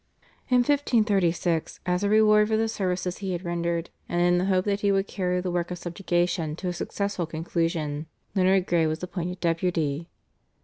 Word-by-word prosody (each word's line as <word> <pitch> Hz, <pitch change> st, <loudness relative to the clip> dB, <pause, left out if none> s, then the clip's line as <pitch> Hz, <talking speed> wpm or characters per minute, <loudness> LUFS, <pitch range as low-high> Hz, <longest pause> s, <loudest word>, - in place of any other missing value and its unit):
In 250 Hz, -1 st, +5 dB
1536, 200 Hz, -, +1 dB
as 180 Hz, +1 st, 0 dB
a 200 Hz, -, +2 dB
reward 210 Hz, 0 st, +5 dB
for 220 Hz, 0 st, +1 dB
the 225 Hz, 0 st, +1 dB
services 185 Hz, -4 st, -2 dB
he 195 Hz, -2 st, -3 dB
had 175 Hz, +1 st, -4 dB
rendered 170 Hz, 0 st, -2 dB, 0.2 s
and 175 Hz, -, 0 dB
in 175 Hz, 0 st, +4 dB
the 180 Hz, -, 0 dB
hope 185 Hz, -1 st, +2 dB
that 200 Hz, -1 st, 0 dB
he 205 Hz, -1 st, +2 dB
would 195 Hz, 0 st, +2 dB
carry 180 Hz, -3 st, -1 dB
the 180 Hz, 0 st, -2 dB
work 175 Hz, -1 st, -1 dB
of 180 Hz, -, -4 dB
subjugation 175 Hz, -2 st, -1 dB
to 180 Hz, +2 st, -4 dB
a -, -, -2 dB
successful 200 Hz, 0 st, -3 dB
conclusion, 160 Hz, -2 st, -2 dB, 0.3 s
Leonard 190 Hz, -1 st, +3 dB
Grey 170 Hz, -3 st, +2 dB
was 155 Hz, +3 st, -3 dB
appointed 180 Hz, 0 st, -4 dB
Deputy. 165 Hz, -2 st, -1 dB
180 Hz, 180 wpm, -26 LUFS, 170-195 Hz, 0.3 s, In